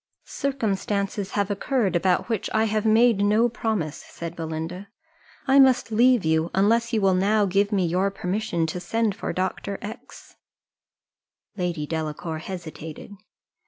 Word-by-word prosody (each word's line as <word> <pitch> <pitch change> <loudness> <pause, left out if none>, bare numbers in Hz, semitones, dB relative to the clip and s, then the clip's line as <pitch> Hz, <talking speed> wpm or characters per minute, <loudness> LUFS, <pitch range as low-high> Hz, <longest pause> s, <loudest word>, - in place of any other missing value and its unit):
"Circumstances 205 -6 -2
have 205 -1 0
occurred, 205 -2 0
about 180 +1 +2
which 225 -5 -2
I 220 - +4
have 215 0 0
made 225 0 +4
no 215 +3 +4
promise," 220 -10 -2
said 170 0 -8
Belinda; 165 +4 -5 0.6
"I 270 0 +5
must 260 -4 +4
leave 240 -2 +4
you, 160 +1 +2
unless 230 +4 +2
you 225 - +1
will 195 -1 +4
now 205 +3 +3
give 200 +2 +1
me 195 -3 +2
your 180 +4 +1
permission 185 -3 -2
to 160 +3 -4
send 220 +4 0
for - - -4
Dr. 190 +2 -3
X 220 +5 -10 0.6
." - - -63
Lady 175 -5 -2
Delacour 160 +1 -4
hesitated. 160 0 -8
200 Hz, 145 wpm, -24 LUFS, 175-220 Hz, 0.6 s, I